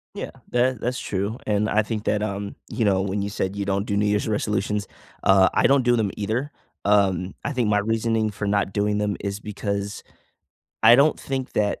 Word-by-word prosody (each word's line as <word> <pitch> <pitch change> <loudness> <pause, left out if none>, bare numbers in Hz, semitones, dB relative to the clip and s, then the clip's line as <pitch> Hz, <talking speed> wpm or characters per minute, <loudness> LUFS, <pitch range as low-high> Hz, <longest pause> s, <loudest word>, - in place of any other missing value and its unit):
Yeah. - - -5 0.2
That 125 +1 +2
i - - -14
that's 125 +3 -2
true, 100 +4 -3
and 105 0 +1
I 110 +1 +3
think 105 0 -4
that, 105 0 +1
um, 100 -1 -4
you 115 - -1
know, 95 -2 +3
when 100 +1 -2
you 100 - -2
said 95 -1 -3
you 100 - -2
don't 100 +1 0
do 100 - -1
New 105 - +2
Year's 105 +1 +1
resolutions, 105 -1 -1 0.4
uh, 95 -1 +5
I - - +4
don't 135 -1 +4
do 120 0 +3
them 105 -4 0
either. 115 +8 -2 0.3
Um, 95 -3 +2
I 140 - -2
think 120 -5 0
my 105 -1 +3
reasoning 110 0 0
for 100 0 -4
not 100 -1 0
doing 105 0 +1
them 105 -3 -1
is 100 0 -4
because 100 -1 -4 0.8
I 115 +1 +9
don't 140 +5 +4
think 130 -1 -4
that 105 -1 0
105 Hz, 215 wpm, -24 LUFS, 100-110 Hz, 0.8 s, I